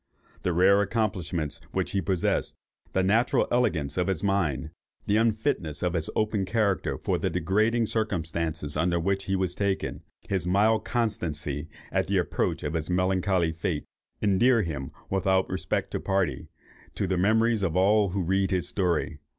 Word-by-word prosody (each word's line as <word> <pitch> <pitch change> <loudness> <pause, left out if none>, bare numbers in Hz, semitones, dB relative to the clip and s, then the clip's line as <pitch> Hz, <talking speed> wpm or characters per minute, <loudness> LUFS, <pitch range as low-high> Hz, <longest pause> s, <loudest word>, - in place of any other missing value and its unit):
The 90 - 0
rare 95 +4 +5
accomplishments 90 -8 -2
which - - -1
he 100 - 0
possessed, 90 0 0 0.4
the 95 - +1
natural 110 +6 +3
elegance 85 - +1
of 90 - +1
his 95 -2 -1
mind, 80 -7 0 0.3
the 105 - +2
unfitness 110 - 0
of 90 -1 0
his 80 -3 -1
open 105 -2 +1
character 100 -3 0
for - - -1
the - - 0
degrading 105 +7 +1
circumstances 85 -8 -2
under 85 +2 +1
which 95 +3 -1
he 95 - 0
was 95 -2 0
taken, 100 0 -1
and - - -23 0.3
his 95 -3 0
mild 105 +4 +3
constancy 80 - -2 0.2
at - - 0
the - - +1
approach - - -1
of 75 - -2
his 80 -1 -2
melancholy 90 -1 +1
fate, 80 -1 -3 0.4
endear 110 +4 +4
him, 75 -5 -4 0.2
without 95 0 +2
respect 95 - -2
to - - -2
party, 95 -2 -1 0.5
to - - 0
the 95 0 0
memories 110 +4 +3
of 90 -3 0
all 100 +2 +4
who 95 +1 -1
read 95 +2 +1
his 90 -2 0
story. 90 -2 -1
95 Hz, 165 wpm, -27 LUFS, 85-105 Hz, 0.5 s, rare